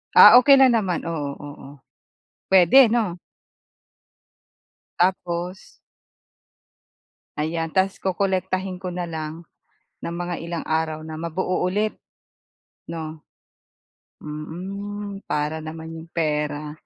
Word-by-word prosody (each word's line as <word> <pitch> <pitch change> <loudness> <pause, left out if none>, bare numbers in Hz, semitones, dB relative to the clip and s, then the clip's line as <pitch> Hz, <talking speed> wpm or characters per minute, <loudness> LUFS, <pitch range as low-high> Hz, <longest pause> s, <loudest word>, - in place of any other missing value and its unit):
Ah, - - +11
okey 275 0 +7
na 265 - +8
naman, 200 -9 0
oo, 155 -4 -3
oo. 145 -2 -10 0.8
Puwede 195 +7 +7
'no? 220 -7 +1 1.8
Tapos? 180 0 0 1.8
Ayan. 165 +1 -2
Tapos 190 +2 +1
kokolektahin 190 0 -1
ko 180 0 -6
na 175 0 -4
lang 160 0 -6 0.6
ng 170 - -4
mga 175 0 -3
ilang 170 0 -5
araw 160 -1 -1
na 155 0 -7
mabuo 175 +3 -1
ulit, 210 +4 -1 0.9
'no? 160 -2 -6 1.0
Mm, 195 +7 -6
para 150 +2 -1
naman 160 +1 -8
yung 165 0 -9
pera 150 -2 -2
170 Hz, 100 wpm, -23 LUFS, 160-190 Hz, 1.8 s, Ah